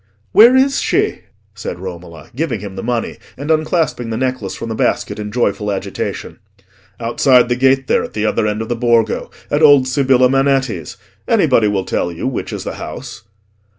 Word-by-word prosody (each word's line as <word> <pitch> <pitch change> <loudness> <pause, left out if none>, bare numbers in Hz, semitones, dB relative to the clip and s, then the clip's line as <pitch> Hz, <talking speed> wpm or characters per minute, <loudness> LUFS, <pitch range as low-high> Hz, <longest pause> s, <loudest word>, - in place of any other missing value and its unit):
"Where 235 +4 +7
is 270 +1 +3
she?" - - 0 0.3
said - - -6
Romola, 85 -3 -9
giving 135 -6 -2
him 100 -1 -8
the - - -5
money, 120 -1 -2 0.2
and 145 +4 -3
unclasping 155 -6 0
the 110 - -3
necklace 125 -6 -2
from 115 - -6
the - - -2
basket 110 - -1
in 105 0 -5
joyful 105 -3 0
agitation. 100 - -5 0.6
"Outside 120 +1 +3
the 120 - +2
gate 135 +1 +2
there, - - +1
at - - -8
the 105 0 -1
other 105 0 +1
end 105 +1 -2
of 110 - -9
the 120 - 0
Borgo, 115 -1 +1 0.2
at 145 - +1
old 145 -4 +6
Sibilla 130 -1 +3
Manetti's: 135 -1 0 0.3
anybody 110 - +3
will 100 -2 -1
tell 85 - -1
you 85 - -6
which 130 - -3
is - - -5
the - - -6
house." - - -8
120 Hz, 185 wpm, -17 LUFS, 105-135 Hz, 0.6 s, Where